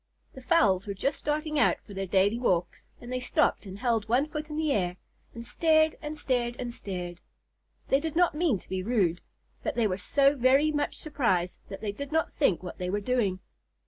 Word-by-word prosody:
The 260 - -10
fowls 210 - +3
were 200 - -3
just 275 +9 -1
starting 305 0 -1
out - - +4
for 205 - -11
their 195 0 -3
daily 200 +5 +2
walks, 180 -8 -1
and 245 +1 -7
they 255 - -1
stopped 255 -4 +1
and 190 +1 -8
held 225 -2 0
one 250 +5 +3
foot 305 0 -5
in 300 - -5
the 310 -2 +1
air, 180 -6 0 0.4
and 230 0 -7
stared 315 +2 +3
and 305 0 -5
stared 245 -4 0
and 240 -1 -4
stared. 180 -5 -6 0.7
They 270 - +4
did 320 +1 -4
not 350 -1 +4
mean 300 - +1
to - - -17
be 190 0 -2
rude, 185 -5 +1 0.4
but - - -3
they 235 - +2
were 190 -2 -1
so 275 +6 +3
very 270 +4 +4
much 290 -1 -1
surprised 235 - -1
that 195 - -7
they 210 - -2
did 280 +7 -7
not 320 +1 0
think 195 - +1
what 180 - -8
they 180 0 -2
were 205 +2 0
doing. 205 -4 0
240 Hz, 210 wpm, -28 LUFS, 195-295 Hz, 0.7 s, out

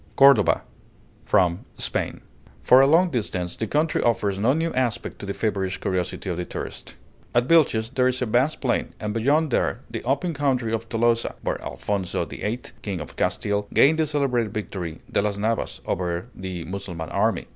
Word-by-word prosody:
CORDOVA 135 -6 +6 0.6
From 90 -1 +3 0.2
'Spain' - - -2 0.4
For 130 +1 +7
a 135 - +6
long 170 +4 +4
distance 90 -7 -2
the 110 - -3
country 155 +5 +1
offers 100 -4 +1
no 115 +5 +3
new 165 +2 -1
aspect 125 -3 -1
to 100 - -7
the 100 - -2
feverish 95 -4 -1
curiosity 95 +1 -2
of 90 -2 -2
the 90 - -3
tourist. - - -7 0.4
At 120 +1 +3
Vilches 130 -9 +3
there 130 -1 +3
is 130 0 0
a 125 - 0
vast 125 +7 +1
plain, 125 -3 -1
and 105 -1 -3
beyond 145 +7 +2
there - - 0
the - - -5
open 145 +7 0
country 130 -6 0
of 115 0 -3
Tolosa, 115 0 +1
where - - -2
Alphonso 100 -4 -2
VIII., 115 +4 -4 0.2
King 100 -4 -3
of - - -8
Castile, 105 0 0
gained 160 +3 +5
the 160 - +2
celebrated 125 -7 0
victory 90 -6 -5
"de - - +2
las 100 -1 -1
Navas" 110 +2 -1
over 90 -1 -2
the 95 -2 -6
Mussulman 90 -3 -6
army. 110 +3 +1
115 Hz, 180 wpm, -24 LUFS, 100-130 Hz, 0.6 s, For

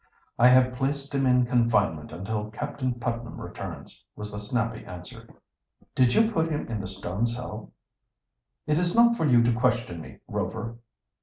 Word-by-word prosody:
"I 120 - +8
have 125 0 +5
placed 140 +2 -2
him 135 -1 +2
in 125 -1 +4
confinement 110 -10 +1
until 105 +5 -4
Captain 130 +2 -3
Putnam 120 0 -4
returns," - - -8
was 105 0 -6
the 105 - -5
snappy 115 +2 -2
answer. 90 -1 -10 0.6
"Did 125 -2 +3
you 225 0 +4
put 165 -5 +1
him 150 -2 -2
in 110 -3 -2
the 95 - -5
stone 95 +3 -2
cell?" 115 -2 -6 0.9
"It 150 +1 +2
is 175 0 +1
not 235 0 +6
for 160 - +1
you 120 -3 +5
to 120 0 +3
question 115 -8 0
me, - - -11
Rover." 115 +1 -4
120 Hz, 165 wpm, -27 LUFS, 105-130 Hz, 0.9 s, I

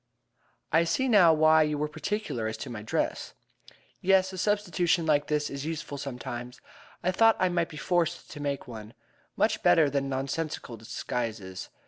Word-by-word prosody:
"I 165 +2 +4
see 170 +11 0
now 200 -8 +6
why 155 0 +5
you 150 -1 +1
were 150 +1 -1
particular 195 - -3
as 110 0 -4
to 130 - -8
my 110 -3 -6
dress." 105 - -2 0.7
"Yes, 190 0 +3
a - - -6
substitution 180 -4 +1
like 145 -2 +2
this 150 -1 0
is 140 0 -6
useful 150 -2 -5
sometimes. 125 -2 -6 0.4
I 185 - +2
thought 225 +4 +5
I 185 - +2
might 170 -1 0
be 155 - -9
forced 175 +1 -1
to 145 - -8
make 140 -1 -3
one. 110 -2 -9 0.4
Much - - +1
better 145 - +4
than 140 -1 -1
nonsensical 135 -1 -3
disguises. 110 -3 -5
150 Hz, 165 wpm, -28 LUFS, 125-175 Hz, 0.7 s, now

